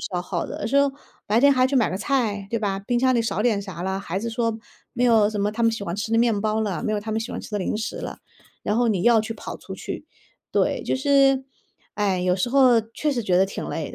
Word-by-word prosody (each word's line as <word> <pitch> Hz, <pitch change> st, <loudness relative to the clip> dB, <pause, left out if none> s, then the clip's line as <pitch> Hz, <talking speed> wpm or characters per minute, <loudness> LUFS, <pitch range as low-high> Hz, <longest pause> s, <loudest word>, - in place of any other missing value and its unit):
消 180 Hz, -2 st, -3 dB
耗 175 Hz, -1 st, -3 dB
的， -, -, -7 dB
有 -, -, -6 dB
的 -, -, -1 dB
时 260 Hz, +5 st, 0 dB
候 280 Hz, 0 st, +4 dB, 0.3 s
白 215 Hz, +2 st, +2 dB
天 280 Hz, +3 st, +6 dB
还 255 Hz, -1 st, +3 dB
去 275 Hz, -, +1 dB
买 245 Hz, -, +3 dB
个 185 Hz, -, -3 dB
菜， 215 Hz, -5 st, -1 dB
对 230 Hz, -, 0 dB
吧， 195 Hz, -2 st, -2 dB
冰 240 Hz, +4 st, -1 dB
箱 260 Hz, 0 st, +3 dB
里 235 Hz, -, +2 dB
少 225 Hz, -3 st, -2 dB
点 215 Hz, -3 st, +1 dB
啥 190 Hz, -4 st, -8 dB
啦， 190 Hz, +1 st, -1 dB
孩 190 Hz, -1 st, -3 dB
子 230 Hz, +3 st, -3 dB
说 230 Hz, -1 st, -1 dB, 0.3 s
“没 245 Hz, -, 0 dB
有 220 Hz, -4 st, +4 dB
什 210 Hz, -2 st, -3 dB
么 205 Hz, +1 st, 0 dB
他 230 Hz, +2 st, -3 dB
们 230 Hz, -, +5 dB
喜 220 Hz, -3 st, -4 dB
欢 170 Hz, -, -3 dB
吃 210 Hz, +2 st, -4 dB
的 225 Hz, -, +3 dB
面 230 Hz, -3 st, +2 dB
包 215 Hz, +1 st, 0 dB
了， 200 Hz, -1 st, -2 dB
没 215 Hz, -, -1 dB
有 210 Hz, -, 0 dB
他 215 Hz, +1 st, -5 dB
们 220 Hz, -, 0 dB
喜 225 Hz, -, -5 dB
欢 -, -, -4 dB
吃 -, -, -11 dB
的 210 Hz, -, 0 dB
零 190 Hz, -, -2 dB
食 220 Hz, +1 st, -4 dB
了”， -, -, -6 dB, 0.5 s
然 210 Hz, -, 0 dB
后 240 Hz, 0 st, +2 dB
你 195 Hz, -5 st, 0 dB
要 235 Hz, -1 st, +5 dB
去 225 Hz, +1 st, -4 dB
跑 -, -, -7 dB
出 -, -, -10 dB
去。 -, -, -6 dB, 0.5 s
对， -, -, +1 dB
就 -, -, -1 dB
是 270 Hz, -1 st, +3 dB, 0.5 s
哎， 200 Hz, -3 st, 0 dB
有 180 Hz, 0 st, +2 dB
时 195 Hz, +6 st, -1 dB
候 255 Hz, -3 st, +5 dB
确 300 Hz, +5 st, -1 dB
实 240 Hz, -3 st, -2 dB
觉 180 Hz, -3 st, +2 dB
得 190 Hz, -, +4 dB
挺 -, -, -6 dB
累 -, -, -4 dB
的， -, -, -8 dB
220 Hz, 310 characters per minute, -23 LUFS, 200-240 Hz, 0.5 s, 天